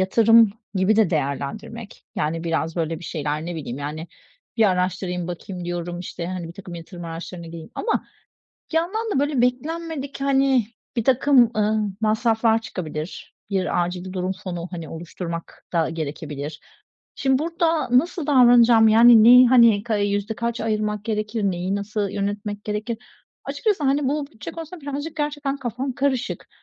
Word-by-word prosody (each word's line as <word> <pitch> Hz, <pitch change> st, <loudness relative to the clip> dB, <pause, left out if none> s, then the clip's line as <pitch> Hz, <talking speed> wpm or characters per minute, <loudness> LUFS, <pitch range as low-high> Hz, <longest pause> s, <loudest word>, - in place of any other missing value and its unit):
yatırım 225 Hz, +2 st, +5 dB, 0.2 s
gibi 195 Hz, +3 st, +3 dB
de 215 Hz, -6 st, +4 dB
değerlendirmek. 170 Hz, -, -4 dB
Yani, 165 Hz, +2 st, -1 dB
biraz, 165 Hz, 0 st, -1 dB
böyle, 165 Hz, -1 st, -1 dB
bir 170 Hz, -, -11 dB
şeyler, 155 Hz, 0 st, -3 dB
ne 175 Hz, -, -4 dB
bileyim, 140 Hz, -5 st, -5 dB
yani, 150 Hz, +3 st, -5 dB, 0.5 s
bir 225 Hz, -, +4 dB
araştırayım 180 Hz, -1 st, -1 dB
bakayım 180 Hz, +1 st, -6 dB
diyorum, 175 Hz, 0 st, -4 dB
işte, 175 Hz, -1 st, -6 dB
hani, 180 Hz, -2 st, -5 dB
birtakım 180 Hz, 0 st, -9 dB
yatırım 170 Hz, +1 st, -9 dB
araçlarına 170 Hz, +1 st, -7 dB
gireyim. 165 Hz, +5 st, -9 dB
Ama 455 Hz, -, -1 dB, 0.7 s
bir -, -, 0 dB
yandan 430 Hz, +7 st, 0 dB
da 270 Hz, -, +2 dB
böyle 285 Hz, -3 st, +1 dB
beklenmedik, 285 Hz, +3 st, -2 dB
hani, 270 Hz, -4 st, +3 dB, 0.3 s
birtakım, 255 Hz, +1 st, +4 dB
ııı, 215 Hz, 0 st, +1 dB
masraflar 225 Hz, +1 st, +2 dB
çıkabilir. 160 Hz, -6 st, -6 dB, 0.2 s
Bir 185 Hz, -2 st, +1 dB
acil 180 Hz, +1 st, -6 dB
durum 185 Hz, 0 st, -2 dB
fonu, 175 Hz, -2 st, -4 dB
hani, 165 Hz, -4 st, -6 dB
oluşturmak 170 Hz, 0 st, -7 dB
da 165 Hz, -2 st, +1 dB
gerekebilir. 150 Hz, -1 st, -5 dB, 0.5 s
Şimdi, 265 Hz, -1 st, +2 dB
burada 330 Hz, -1 st, 0 dB
nasıl 335 Hz, +1 st, -2 dB
davranacağım? 240 Hz, -5 st, +6 dB
Yani, 230 Hz, 0 st, +8 dB
neyi, 250 Hz, +2 st, +9 dB
hani, 235 Hz, -5 st, +6 dB
ka 220 Hz, -1 st, -1 dB
iii, 205 Hz, 0 st, +1 dB
yüzde 205 Hz, +2 st, -2 dB
kaç 235 Hz, +1 st, -3 dB
ayırmak 210 Hz, -1 st, -1 dB
gerekir? 215 Hz, 0 st, -2 dB
Neyi, 185 Hz, 0 st, -1 dB
nasıl 205 Hz, 0 st, -2 dB
yönetmek 205 Hz, +1 st, -3 dB
gerekir? 215 Hz, +2 st, -3 dB, 0.5 s
Açıkçası, 410 Hz, -9 st, -1 dB
hani, 275 Hz, 0 st, +2 dB
bu 290 Hz, +1 st, -1 dB
bütçe 250 Hz, -7 st, -9 dB
konusunda 330 Hz, +1 st, -8 dB
birazcık 290 Hz, +3 st, -5 dB
gerçekten 290 Hz, -2 st, -2 dB
kafam 260 Hz, 0 st, -3 dB
karışık. 275 Hz, -1 st, -2 dB
210 Hz, 150 wpm, -23 LUFS, 175-255 Hz, 0.7 s, neyi